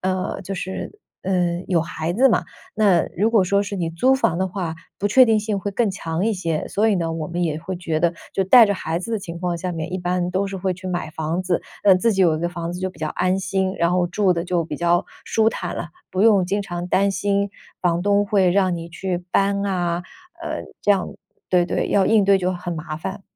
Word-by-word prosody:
呃， 185 0 -2
就 195 +1 -5
是， 190 - -5 0.2
嗯， 180 -1 0
有 175 -3 +3
孩 160 0 -3
子 265 +4 +5
嘛， - - +2 0.3
那 200 -6 +3
如 215 +5 +2
果 215 -5 +4
说 200 +2 +2
是 200 0 -5
你 170 -2 -1
租 255 +11 +2
房 215 -10 +1
的 190 0 0
话， 175 -4 -4 0.2
不 205 - 0
确 255 +5 +7
定 220 -2 +3
性 210 -1 -2
会 205 - -3
更 225 +2 +1
强 170 +1 -2
一 225 - +2
些， 165 -5 -2
所 220 +2 +1
以 205 - +2
呢， 165 -2 -1
我 160 -2 -4
们 175 +1 -1
也 155 -2 -1
会 185 +1 -5
觉 165 -3 -2
得， 170 0 +2 0.2
就 195 - +2
带 225 +4 +7
着 200 - 0
孩 165 -2 -2
子 230 +6 -5
的 220 - 0
情 170 -2 -7
况 175 -1 -1
下 180 +1 -3
面， 165 +1 -5
一 185 - -1
般 180 0 -1
都 195 +1 0
是 195 - -5
会 185 0 -1
去 185 +1 -7
买 175 -3 -2
房 160 +2 -2
子。 180 -1 0 0.2
那 195 - +7
自 215 +5 +2
己 195 -1 +2
有 165 -3 +4
一 - - -5
个 175 - 0
房 170 0 -5
子 180 - -6
就 185 0 -2
比 170 - -19
较 155 - -2
安 185 +4 0
心， 190 0 -1
然 170 +1 +2
后 180 -1 +2
住 190 0 +2
得 170 -1 -2
就 175 -2 0
比 155 -2 -5
较 175 +1 +2 0.2
舒 220 0 +2
坦 180 -5 -4
了， 170 - -5 0.2
不 185 - -2
用 205 -5 +5
经 200 +3 -1
常 175 -2 -5
担 200 +2 +3
心 200 +1 0 0.3
房 175 -1 +1
东 205 0 +2
会 195 -4 +3
让 185 -1 +2
你 165 0 -7
去 180 +1 -3
搬 200 0 +2
啊， 175 -3 -1 0.4
呃， - - -4 0.2
这 205 - +2
样 195 -3 +2 0.4
对 180 -1 +3
对， - - -1
要 195 -2 +3
应 215 -3 +4
对 195 0 +5
就 185 0 0
很 175 -1 -5
麻 155 -1 -5
烦。 190 +5 -6
185 Hz, 265 characters per minute, -22 LUFS, 175-200 Hz, 0.4 s, 确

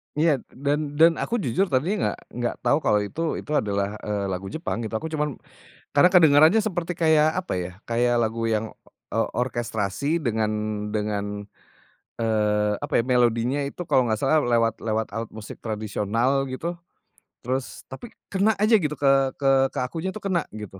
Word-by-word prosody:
Iya, 160 +1 +3
d - - -22
dan 145 +1 +2 0.2
dan 165 +1 +8
aku 235 - -1
jujur 185 +11 +1
tadinya 155 +8 0 0.2
nggak - - -11 0.2
nggak 120 -1 -1
tahu 145 - +3
kalau 105 - +4
itu 130 +11 -5 0.2
itu 150 - -10
adalah, 100 -5 -1
eee, 105 -1 -2
lagu 95 +1 -4
Jepang 160 - -4
gitu. 110 - -6
Aku 160 +8 -3
cuman 150 -3 -1 0.6
karena 145 +5 +6
kedengerannya 160 +4 +6
seperti 175 -5 -2
kayak, 155 -2 +4
apa 185 - -6
ya, 90 0 -3 0.2
kayak 120 +1 +2
lagu 115 +1 -2
yang, 110 0 0 0.5
eee, - - +1
orkestrasi 120 - -2
dengan 110 -5 0 0.4
dengan, 105 -1 -3 0.8
eee, 105 -2 +1
apa - - -5
ya, - - -8
melodinya 120 +2 +2
itu 140 +5 -6
kalau 130 - +4
nggak 110 -2 0
salah 155 +3 +3
lewat 115 -2 +2
lewat 110 0 -1
alat 115 -1 -4
musik 110 -1 -9
tradisional 110 +5 0
gitu, 165 +7 -4 0.7
terus 130 +2 -3
tapi 175 - -8 0.2
kena 205 +3 +2
aja 215 +3 +4
gitu 150 -2 -2
ke 140 0 +3 0.3
ke 135 -1 +1 0.2
ke - - -3
akunya 165 +7 -4
tuh 215 - -7
kena, 185 -4 +1
gitu. 105 -3 -8
125 Hz, 170 wpm, -24 LUFS, 110-155 Hz, 0.8 s, dan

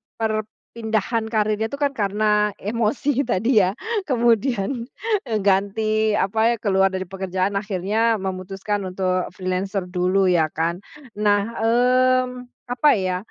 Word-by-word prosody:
perpindahan 220 0 -2
karirnya 215 0 0
itu 280 - -6
kan 285 -1 0
karena, 210 -2 +1
emosi 235 +6 -1
tadi 225 +1 +3
ya. 190 +1 +1 0.3
Kemudian, 240 -1 +1 0.4
eee, 220 -2 0
ganti 200 +2 +1 0.2
apa, 220 +4 +2
keluar 195 -1 +3
dari 190 0 -2
pekerjaan, 190 +1 -2
akhirnya 210 +3 0
memutuskan 195 +2 -3
untuk 185 0 -1
freelancer 185 +1 -2
dulu 185 +2 +1
ya 165 -3 +3
kan. 170 +2 -1 0.4
Nah 205 -1 +3 0.2
mmm, 250 +2 +2 0.2
apa 295 +5 +3
ya, 185 -2 -1
210 Hz, 115 wpm, -22 LUFS, 190-230 Hz, 0.4 s, tadi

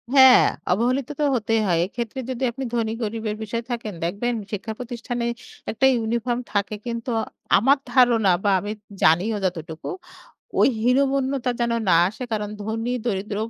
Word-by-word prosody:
হ্যাঁ 265 -1 +9 0.3
অবহেলিত 250 +7 +1
তো - - +2
হতেই 225 -1 +1
হয়। 170 -2 +2
এক্ষেত্রে 235 +5 -5
যদি 260 +1 -3
আপনি 265 +3 -6
ধনী-গরিবের 225 -1 -2
বিষয় 230 +2 -3
থাকেন 225 -4 -4
দেখবেন 205 +8 -1 0.2
শিক্ষা 215 +2 -4
প্রতিষ্ঠানে 240 -1 -4 0.5
একটা 225 +5 +1
ইউনিফর্ম 235 +1 -1
থাকে 205 +1 0
কিন্তু 235 +1 -4 0.5
আমার 270 +7 +4 0.2
ধারণা 235 -7 +5
বা 200 - +3
আমি 205 +2 -5 0.3
জানিও 185 +7 +3
যতটুকু 165 -3 -4 0.7
ওই - - +6
হীনমন্যতা 270 0 +2
যেন 235 0 +1 0.2
না 170 - +6
আসে 215 - -9
কারণ 210 -1 -1
ধনী-দরিদ্র 220 -2 -2
230 Hz, 140 wpm, -23 LUFS, 210-245 Hz, 0.7 s, হ্যাঁ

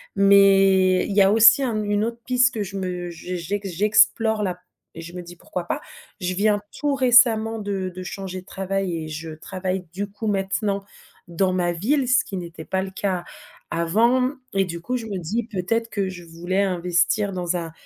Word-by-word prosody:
mais 195 -2 +5
il 205 - -3
y 205 - +6
a 195 +1 +5
aussi 225 +5 +7
un 225 -5 -1
une 205 0 0
autre 230 +1 -3
piste 250 0 +3
que 215 - -2
je 195 0 -8
me 180 -2 -4
je 175 +2 -6
j'ex 195 +4 -4
j'explore, 215 +3 +3
là 180 -2 -3 0.4
et - - -6
je 170 +1 -10
me 180 - -6
dis: 175 0 -11
«Pourquoi 175 +1 -6
pas?». - - -3 0.4
Je 180 0 -1
viens 205 +1 +2 0.2
tout 290 -1 0
récemment 230 -3 +4
de 200 -3 -3
de 185 - -7
changer 185 0 -6
de - - -23
travail 190 -2 -3
et 160 -1 -5
je 160 +1 -6
travaille, 185 +3 -4
du 205 +2 -3
coup, 210 +2 -6
maintenant 200 0 -1 0.4
dans 185 +2 0
ma 175 -1 +1
ville, 255 - 0
ce 255 +1 +4
qui 195 - -6
n'était 170 -2 -7
pas 190 0 -1
le 190 - -7
cas 190 -2 -2 0.5
avant. 235 +10 +2 0.2
Et 195 0 +2
du 170 -1 -6
coup, 250 +7 -3
je 230 -2 -7
me 200 -3 -4
dis: 210 +8 -2
«Peut-être 225 +4 -1
que 200 -3 -2
je 175 -2 -9
voulais 175 +4 -2
investir 185 +2 +1
dans 180 -1 -1
un 165 -2 -5
195 Hz, 200 wpm, -23 LUFS, 180-215 Hz, 0.5 s, aussi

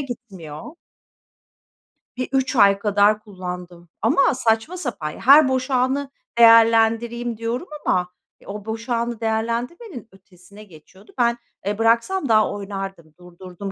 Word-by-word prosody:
gitmiyor. 195 - -8 1.5
Bir 255 - -3
3 265 0 0
ay 200 -2 +5
kadar 205 +1 +2
kullandım 180 -3 -9
ama 285 +8 +3
saçma 235 +8 0
sapan... 230 - -4
Ya, - - -12
"Her 280 +3 +7
boş 260 +1 -2
anı 265 +2 0 0.3
değerlendireyim." 230 0 +4
diyorum 235 +9 -4 0.2
ama 180 -1 +1 0.3
e, - - -20
o, 205 +1 -7
boş 225 +2 -6
anı 235 -1 -2
değerlendirmenin 235 - -3
ötesine 195 +1 -17
geçiyordu. 190 +3 -18
Ben, 235 -1 +2 0.3
eee, 205 +1 -2
bıraksam 235 +8 +1
daha 215 -1 +3
oynardım, 195 -5 -7
durdurdum 180 +2 -9
225 Hz, 125 wpm, -21 LUFS, 195-245 Hz, 1.5 s, Her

